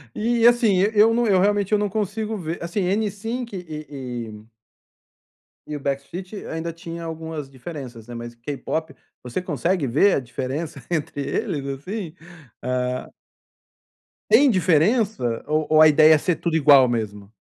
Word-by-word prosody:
E 230 +1 +1
assim, 235 -6 +5
e 205 +3 +3
eu 215 +2 +6
não 240 +1 +2
eu 195 -4 +4
realmente 205 +1 +1
eu 210 - +4
não 205 -1 0
consigo 215 +1 -2
ver, 165 -1 -5
assim, 170 +4 -2
N-Sync 215 +4 -2
e 155 -5 -7 0.4
e 105 0 -11 1.2
e 150 - -5
o - - -4
Backstreet 140 +8 -4
ainda 165 +1 -4
tinha 170 0 -8
algumas 160 -3 -6
diferenças 130 -5 -9
né, 120 - -8
mas 120 0 -7
K-pop, 140 +4 -4 0.3
você 125 +9 -3
consegue 170 -2 -1
ver 155 +11 +4
a - - +1
diferença 135 +4 -5
entre 150 -3 -2
eles 150 -3 -2
assim? 165 +6 -5 0.5
Ah. 125 0 -2 1.2
Tem 280 -1 +6
diferença 185 - +2
ou 155 0 0
ou 155 0 +6
a 155 - +9
ideia 155 +1 +7
é - - +6
ser 170 +3 0
tudo 170 -2 -2
igual 140 -4 +7
mesmo? 105 -3 -4
160 Hz, 155 wpm, -23 LUFS, 140-200 Hz, 1.2 s, a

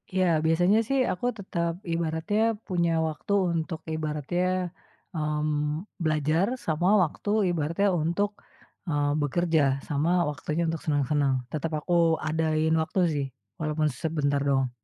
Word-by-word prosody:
Ya, 185 0 +3 0.2
biasanya 175 +6 +4
sih 275 -1 +1
aku 180 +7 -4
tetap 170 -4 -2 0.2
ibaratnya 165 +5 -1 0.3
punya 170 -3 +1 0.2
waktu 155 +6 -3 0.2
untuk 160 0 -2 0.2
ibaratnya, 155 +3 -2 0.7
eee, 150 -1 -1 0.6
belajar, 155 +4 +2 0.2
sama 165 +3 +1 0.2
waktu 170 +5 -4 0.2
ibaratnya 170 +5 0
untuk, 175 +6 +1 0.6
eee, 145 -2 +1
bekerja, 160 +2 +1 0.3
sama 150 +3 0 0.2
waktunya 150 +3 -2
untuk 160 -1 -2
seneng-seneng, 145 -2 +1 0.2
tetap 155 +1 -2
aku 175 +4 -3 0.3
adain 160 0 +1
waktu 160 +4 -2
sih, 140 -2 -1 0.3
walaupun 155 0 0
sebentar 145 -3 0
doang. 135 -2 +2
160 Hz, 120 wpm, -27 LUFS, 150-170 Hz, 0.7 s, biasanya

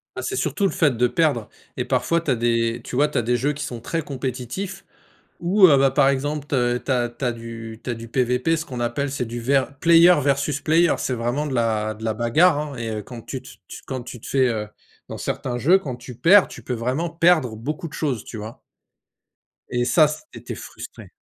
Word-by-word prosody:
Ah, - - -4
c'est 395 - -2
surtout 215 - -1
le 195 - +2
fait 150 -10 +2
de 125 +1 +3
perdre 140 -7 +1 0.3
et - - -1
parfois 170 0 +1
tu 155 - -1
as - - +3
des 115 0 0
tu - - -7
vois, 145 +3 +4
tu 150 - -4
as - - +1
des 120 +2 +1
jeux 145 +4 0
qui 150 - -5
sont 120 -2 -6
très 165 +7 -2
compétitifs 135 - -5 0.6
ou 185 +3 +6
heu, 150 -5 +6
bah, 135 0 +4
par 135 +1 +4
exemple, 145 +2 -1
te 120 -4 +1
tu 135 - -7
as 120 -2 +1
tu 120 +3 -7
as 120 - +1
du 115 -1 -8
tu - - -4
as - - -1
du 115 0 -9
PVP, 125 +6 +1
ce 160 - -4
qu'on 125 -5 -6
appelle, 120 +4 -1
c'est 135 -2 -2
du 120 +1 -6
vers 135 +3 +1
player 170 +3 +7
versus 140 +1 0
player, 165 +3 +3
c'est 130 - -1
vraiment 120 +5 -1
de 140 - -3
la 110 -2 0
de 110 +1 -10
la 110 -1 0
bagarre, 145 +9 +3
hein 150 -2 -4
et 115 -2 -4
heu, 105 - -4
quand 120 +2 -10
tu 130 +2 -6
tu - - -13
tu - - -9
quand 130 -2 -4
tu 120 -1 -9
te - - -11
fais, 130 -2 +2
heu, 110 -3 -2 0.4
dans - - -7
certains 120 -2 -3
jeux, 175 +10 +5
quand 135 -9 -6
tu 125 +1 -10
perds, 185 - +6
tu 120 - -11
peux 125 +2 -3
vraiment 130 +9 -2
perdre 165 -9 +3
beaucoup 150 +8 -4
de - - -19
choses, 135 -8 -2
tu - - -9
vois? 110 +2 -8 1.1
Et 120 0 0
ça, 155 +4 +5
c'est 155 - -9
tu - - -5
es - - -7
frustré. - - -10
130 Hz, 245 wpm, -22 LUFS, 120-150 Hz, 1.1 s, player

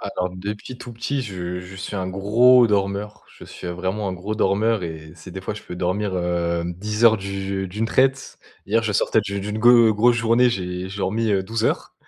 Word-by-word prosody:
Alors 90 -2 -3
depuis 105 +6 -6
tout 120 - -9
petit 130 +5 -2
je 90 -5 -5
je 90 +1 -11
suis 95 +2 -6
un 95 -1 -2
gros 115 +6 +5
dormeur, 100 0 -2
je - - -11
suis - - -10
vraiment 95 +4 -3
un - - -2
gros 100 +4 -4
dormeur 110 +1 +1
et 80 -2 -7
c'est 90 +3 -12
des 95 - -7
fois - - -3
je 105 - -10
peux 90 - -8
dormir, 95 +2 -1
hem, 85 -1 -1
10 105 +5 -2
heures 110 -1 +7
d'u 95 0 -4
d'une 105 +5 -2
traite. 135 +3 +1 0.3
Hier 115 +3 +2
je 110 -2 -1
sortais 110 - +2
d'une 100 -1 -4
d'une 105 +2 -4
go 120 -1 +6
grosse 120 +3 +4
journée. 115 +2 +3
J'ai 90 -3 -4
j'ai 100 +1 -8
dormi, 110 +4 0
heu, 95 -2 +2
12 110 +3 -3
heures - - -1
100 Hz, 215 wpm, -22 LUFS, 95-110 Hz, 0.3 s, heures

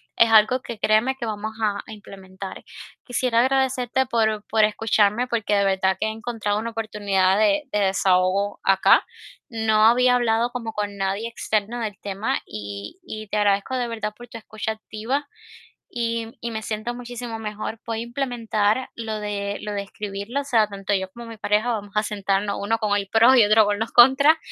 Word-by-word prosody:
es 230 - +5
algo 220 +4 +5
que, 235 - -7
créeme 220 +5 +2
que 240 - -5
vamos 215 +1 -4
a 205 -2 0
a - - -10
implementar. 195 -2 -10 0.4
Quisiera 245 -1 0
agradecerte 265 0 +1
por 220 -3 0
por 220 0 +3
escucharme, 215 +2 +2
porque 220 -4 0
de 200 0 +2
verdad 190 -1 +1
que 215 - 0
he 220 - -1
encontrado 225 -3 -2
una 230 - -3
oportunidad 205 -4 +1
de 295 +8 +3
de 210 - 0
desahogo 190 0 +1
acá. 190 -1 +5 0.5
No 220 -2 +2
había 250 +1 +4
hablado 235 0 +1
como 230 -3 -5
con 205 -1 -4
nadie 195 +3 -2
externo 220 0 -2
del 210 -2 -4
tema 200 +2 -2
y 100 - -7
y 215 - -8
te 210 - -2
agradezco 205 +4 +1
de 245 -2 -1
verdad 220 -2 -4
por 240 0 -12
tu 230 - -9
escucha 215 0 -5
activa 225 +6 -4 0.7
y 230 -1 -1
y 235 - -4
me 220 -1 -4
siento 215 +3 -4
muchísimo 240 -1 -6
mejor. 215 +1 -5
Voy 225 -1 -3
a - - -3
implementar 235 -2 -1
lo 220 -2 -4
de 205 -1 -3
lo 210 - -4
de 200 -1 -2
escribirlo, 200 +5 -5
o - - -6
sea, 230 -6 +3
tanto 200 0 -3
yo 190 -1 -1
como 235 0 -10
mi 230 -1 -9
pareja 215 +3 +1
vamos 205 -3 -4
a 210 - +3
sentarnos 200 -1 -1
uno 225 +3 0
con 215 -2 -2
los 195 -1 -4
pros 235 +5 +6
y 235 - +7
otro 215 +1 +5
con 205 0 0
los 225 +1 -3
contras. 265 +6 +7
220 Hz, 190 wpm, -23 LUFS, 205-235 Hz, 0.7 s, y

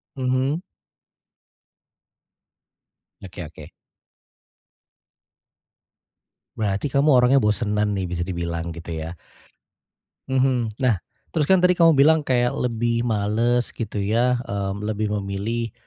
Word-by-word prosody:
Mhm. 130 +4 0 2.6
Oke 90 -2 -8
oke. 75 -1 -11 2.9
Berarti 105 +4 -1
kamu 140 +3 +2
orangnya 125 +2 +5
bosenan 105 -1 0
nih 95 -2 -2
bisa 85 0 -2
dibilang 85 -2 -4
gitu 85 0 -7
ya, 85 - -6 1.2
mhm, 130 -4 +1
nah 120 -8 +2 0.3
terus 155 -1 0
kan 190 - +6
tadi 180 0 +4
kamu 165 -4 +4
bilang 160 +3 +6
kayak 120 -3 +1
lebih 115 -1 -1
males 115 +2 0
gitu 110 -2 -4
ya, 120 +5 +2
mmm, 100 0 -3
lebih 110 0 -1
memilih, 105 +4 -3
115 Hz, 100 wpm, -23 LUFS, 100-130 Hz, 2.9 s, kan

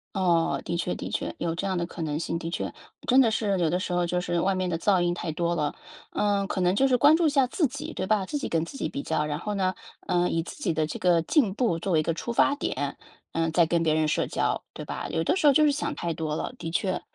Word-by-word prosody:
哦， 175 -4 +2
的 170 0 -2
确 175 +1 -1
的 - - -5
确， - - -3
有 165 -1 -1
这 185 - -3
样 190 -1 0
的 170 -1 -1
可 170 - -6
能 150 -1 -2
性， 165 - -2
的 165 - -5
确， - - -3 0.4
真 260 +1 +6
的 235 -4 +5
是 205 -3 0
有 170 - +2
的 180 - +1
时 185 - -4
候 175 0 +2
就 180 +1 -1
是 175 -1 -1
外 195 +3 +2
面 185 -1 -1
的 165 - -1
噪 185 +1 +2
音 175 0 +2
太 170 -2 -3
多 170 +2 -1
了， 150 -3 -1 0.4
呃， 205 -1 +1
可 195 - -2
能 180 +1 +3
就 270 +6 +4
是 255 - +3
关 290 +5 +6
注 335 0 +2
一 - - +5
下 275 -3 +3
自 310 +6 +1
己， 275 +2 -5
对 185 - -3
吧？ 205 0 +2
自 295 - -2
己 285 - -3
跟 165 -1 0
自 170 - -8
己 - - -1
比 280 - -4
较， 150 - -1
然 150 0 -3
后 210 +3 -3
呢， 185 -1 +1 0.3
呃， 175 0 +1
以 165 - 0
自 - - -9
己 190 - +1
的 155 -1 0
这 150 - -6
个 175 -2 +3
进 250 - +2
步 220 -9 +1
作 190 - -3
为 160 - +4
一 - - +1
个 165 - 0
出 205 +8 -4
发 235 - +4
点， 285 - -3 0.4
呃， 165 0 0
再 165 +1 +4
跟 170 +1 +1
别 155 -2 +2
人 155 0 +2
社 - - 0
交， - - -1
对 - - -7
吧？ - - -5
有 160 - -1
的 165 - +2
时 340 -5 +3
候 285 - +7
就 305 +3 +5
是 295 - +4
想 285 +1 -2
太 170 -1 -2
多 155 -1 -3
了， - - -4
的 165 - -4
确， 185 +3 -1
180 Hz, 320 characters per minute, -26 LUFS, 165-215 Hz, 0.4 s, 候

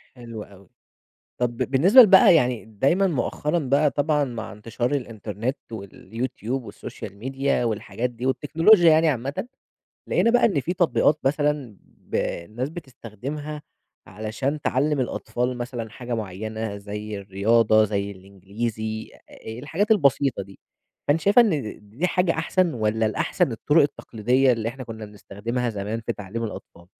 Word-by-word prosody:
حلو 115 -3 -8
أوي. 100 -2 -17 0.7
طَب 120 -1 -1
بالنسبة 180 - +6
ل 225 - +8
بقى 185 -2 +8
يعني 125 -6 +1
دايمًا 135 - +2
مؤخرًا 150 +2 -1
بقى 140 +1 +2
طبعًا 150 0 +1
مع 115 -4 -6
انتشار 120 +6 -2
الInternet 110 +2 -4 0.2
والYouTube 115 +5 -5
والSocail - - -8
media 135 +1 -1
والحاجات 115 +2 -2
دي 120 +1 -7
والتكنولوجيا 165 +7 +5
يعني 160 +1 +4
عامةً 140 - -3 0.6
لقينا 230 - +3
بقى 245 0 +5
إن 190 -11 +2
في 175 +7 -2
تطبيقات 160 -3 +2
مثلًا 145 -5 0
ب - - -11
الناس 110 +10 -2
بتستخدمها 145 - -7 0.5
علشان 110 +9 -3
تعلّم 145 +2 +1
الأطفال 125 0 -2
مثلًا 120 -2 -5
حاجة 120 +2 -6
معيّنة، 110 0 -4
زي 105 +1 -6
الرياضة 110 +3 +3
زي 100 -1 -1
الإنجليزي 105 +3 -5
أ - - -20 0.4
أ - - -7
الحاجات 175 - -1
البسيطة 140 - +3
دي، 95 0 -16 0.5
فأنتِ 145 +3 +3
شايفة 205 +5 +6
إن 155 - -1
دي 145 - -1
حاجة 180 -1 +2
أحسن، 165 +1 +1
والّا 110 -1 0
الأحسن 110 +4 0
الطرق 145 +8 +3
التقليدية 130 -1 +1
اللي 115 -1 -1
إحنا 130 +2 -8
كنّا 110 -2 -8
بنستخدمها 105 +4 -4
زمان 105 +1 -4
في 115 +1 -3
تعليم 105 +3 -6
الأطفال؟ 85 -5 -8
120 Hz, 140 wpm, -24 LUFS, 110-145 Hz, 0.7 s, ل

